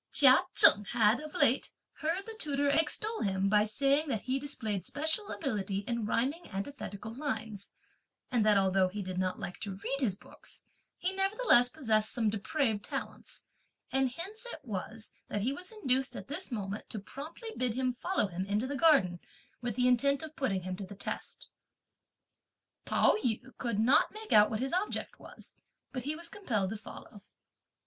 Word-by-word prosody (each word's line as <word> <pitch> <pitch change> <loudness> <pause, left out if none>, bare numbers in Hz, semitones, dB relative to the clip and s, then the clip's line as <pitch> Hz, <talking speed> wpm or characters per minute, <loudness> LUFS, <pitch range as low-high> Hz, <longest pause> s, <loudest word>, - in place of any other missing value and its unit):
Chia 265 -3 +7 0.2
Cheng 205 - +9
had, 220 +3 +3
of 305 0 -9
late, 255 +4 +3 0.3
heard 335 +5 -1
the 450 - -7
tutor 285 -1 +1
extol 370 +10 +1
him 195 -1 +1
by 210 0 +4
saying 280 +7 +2
that 225 -7 -2
he 260 +1 -1
displayed 220 - -1
special 315 - -1
ability 200 - -2
in 235 -3 -1
rhyming 275 +10 -1
antithetical 205 0 -6
lines, 220 -7 -4 0.6
and 240 -4 +2
that 210 -1 +5
although 190 -1 +3
he 200 +2 -5
did 185 0 -4
not 185 0 -1
like 180 - -6
to 200 -2 -5
read 235 +8 -3
his 225 -9 +1
books, - - -7 0.3
he 370 +2 -1
nevertheless 390 - +4
possessed 220 -7 +1
some 225 -4 +1
depraved 220 0 -1
talents, - - -6 0.5
and 265 -1 +2
hence 420 - -5
it - - -8
was 220 +1 -5 0.2
that 205 - -2
he 250 +6 0
was 360 +8 -4
induced 265 - 0
at - - -7
this 300 +4 -5
moment 205 -2 -4
to - - -5
promptly 305 - -8
bid 250 -3 0
him 255 -1 0
follow 355 - 0
him 185 -1 -4
into 210 +4 0
the 285 +2 -3
garden, 270 - +4 0.4
with 240 -3 -3
the 250 0 +2
intent 280 +4 +3
of 315 0 -8
putting 195 -9 -1
him 185 0 -4
to 195 - -7
the 195 +1 -9
test. 195 - -5 1.4
Pao - - +3
yü 245 +2 -2
could 235 -4 -1
not 240 +6 +4
make 435 0 -5
out 210 0 +7
what 220 +1 -3
his 265 +4 -2
object 375 +4 -2
was, - - -11 0.3
but 255 -2 -5
he 300 +2 -1
was 335 +1 -5
compelled 220 - -2
to 220 - -4
follow. 205 0 -11
250 Hz, 180 wpm, -31 LUFS, 205-290 Hz, 1.4 s, Cheng